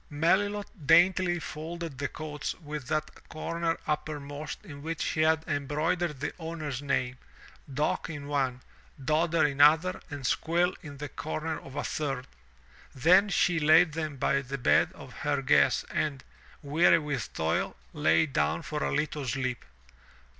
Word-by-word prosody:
Melilot 190 - 0
daintily 175 +2 +5
folded 160 -2 -6
the 145 - 0
coats 150 -1 -5
with 150 -5 -7
that 155 +1 -3
comer 165 +1 -2
upper 150 0 -2
most 145 +2 -7
in 145 -2 -9
which 165 +2 -4
she 155 - 0
had 160 0 +3
embroidered 150 +2 -1
the 145 - -3
owner's 155 -5 -4
name 130 -3 -1 0.3
— - - -19
Dock 150 +4 -1
in 150 -3 -6
one. 135 -3 -1 0.4
Dodder 160 +3 +2
in 145 -1 +1
another, 160 +5 +5
and 145 -3 -6
Squill 175 +7 +1
in 145 -3 -9
the 150 +1 -5
comer 155 +2 -4
of 135 - -12
a - - -2
third. 135 -4 -2 0.7
Then 180 +9 +5
she 175 -3 +2
laid 155 +2 +5
them 155 -3 -3
by 140 +1 +1
the 135 +1 -5
bed 125 - +3
of - - -12
her - - 0
guests - - +4
and, 140 -4 -1 0.4
weary 160 +4 +5
with 145 -8 -3
toil, 80 +1 -1 0.2
lay 80 - +3
down 75 - 0
for - - -4
a 70 - 0
little 150 - -1
sleep. 130 -1 -2
150 Hz, 155 wpm, -29 LUFS, 140-165 Hz, 0.7 s, daintily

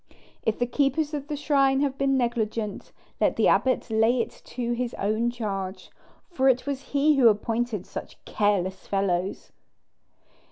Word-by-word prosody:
If 220 - 0
the 245 - +1
keepers 285 +4 0
of 285 -1 -4
the 295 - -3
shrine 275 -2 +2
have 280 -2 0
been 275 -1 +1
negligent, 225 -4 -2 0.3
let - - +2
the - - +3
abbot 255 -2 +2
lay 225 +3 +3
it 230 - -1
to 240 -1 -3
his 240 0 -2
own 215 +4 0
charge, 195 -5 -5 0.4
for 265 -6 +3
it 255 -1 +2
was 280 -2 -3 0.2
he 295 +1 +4
who 245 -4 +7
appointed 225 0 -1
such - - -8
careless 190 -3 0
fellows." 195 -1 -1
240 Hz, 155 wpm, -26 LUFS, 210-270 Hz, 0.4 s, who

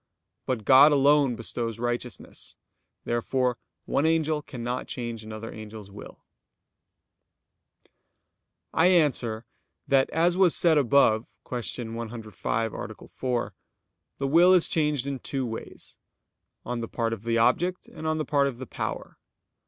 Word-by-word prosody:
But 120 -5 -2
God 135 +3 +8
alone 140 -2 +4
bestows 115 0 -4
righteousness. 120 0 -5 0.5
Therefore 125 +1 0 0.3
one 145 - +1
angel 160 -2 +1
cannot 125 -3 -5
change 120 -3 -5
another 110 +1 -7
angel's 110 -2 -10
will. 100 - -12 2.5
I 165 - +4
answer 130 -10 +2 0.4
that, 135 -1 +3
As 170 +2 +2
was 185 -3 +4
said 160 -3 +4
above 120 -4 +3 0.2
(Q. 120 -1 -4
105, 115 -1 -3
A. - - -8
4), 125 -2 -2 0.6
the 135 - -1
will 175 +6 +6
is 175 - +4
changed 150 -5 +1
in 140 -1 -3
two 135 0 -3
ways; 115 -1 -8 0.7
on 120 0 -3
the 115 - -4
part 115 -1 -2
of 110 - -6
the 115 +1 0
object, 175 +10 +1
and 160 - -7
on 155 0 0
the 155 - -2
part 140 -1 +2
of 130 -4 -5
the 130 - -7
power. - - -5
125 Hz, 135 wpm, -26 LUFS, 115-150 Hz, 2.5 s, God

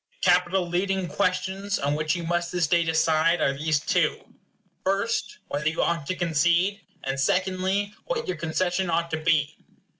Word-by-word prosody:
The 180 - +6
capital 180 +1 +2
leading 190 +1 -1
questions 190 +2 -1
on 140 +1 0
which 155 +2 0
you 175 - -4
must 175 +1 -1
this 180 -2 +1
day 170 +2 +3
decide 160 +1 +2
are 140 - +2
these 155 +1 +1
two: - - -1 0.5
First, 200 - -1
whether 150 +2 -1
you 160 - -1
ought 165 -4 -1
to 185 - -1
concede; 175 +4 +1 0.2
and 135 0 -2
secondly, 190 +6 0
what - - -2
your 375 - -2
concession 175 +3 -1
ought 170 0 0
to 160 - 0
be. 155 -2 +1
175 Hz, 170 wpm, -25 LUFS, 160-190 Hz, 0.5 s, The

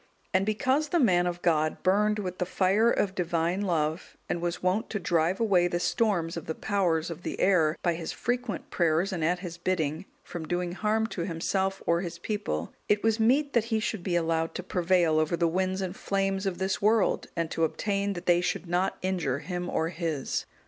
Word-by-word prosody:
And 190 +2 +2
because 265 +7 +1
the 345 - +2
man 180 - +4
of 175 0 -4
God 155 -2 +1
burned 210 +3 +3
with 185 -3 -4
the 180 - +1
fire 195 +5 +3
of 195 -4 +1
divine 170 +1 0
love, 160 -4 -1
and 170 - -2
was 175 0 -3
wont 190 +5 +1
to 210 - -2
drive 170 0 +1
away 190 -6 +3
the 175 0 -1
storms 180 -6 0
of 170 - -6
the 160 - -3
powers 175 -6 0
of 165 +1 -7
the - - -5
air, 165 -5 +3
by 175 - +2
his 165 -1 -4
frequent 245 -4 -3
prayers 170 +3 +1
and 170 -4 -2
at 175 +2 +1
his 175 -2 -7
bidding, 170 -1 -1 0.2
from 165 -3 -7
doing 175 +1 -1
harm 215 +4 0
to 200 -5 -4
himself, 190 +3 -1
or 170 +1 +2
his 170 -2 -5
people, 210 +4 -3 0.2
it 210 0 +2
was 225 0 +2
meet 275 +6 +3
that 235 -2 +3
he 225 -1 0
should 215 -2 -2
be 175 0 -1
allowed 165 -1 0
to 185 - -4
prevail 175 -4 +2
over 155 +2 +1
the 170 0 +2
winds 185 +3 0
and 185 0 -4
flames 195 0 -1
of 185 - -2
this 190 0 -1
world, 215 0 +2
and 170 -2 -2
to 165 - 0
obtain 200 +4 0
that 175 - -7
they 175 0 +4
should 180 - -2
not 180 +2 0
injure 175 -8 0
him 180 +3 -4
or 160 0 0
his. 165 -6 -3
180 Hz, 210 wpm, -28 LUFS, 170-200 Hz, 0.2 s, man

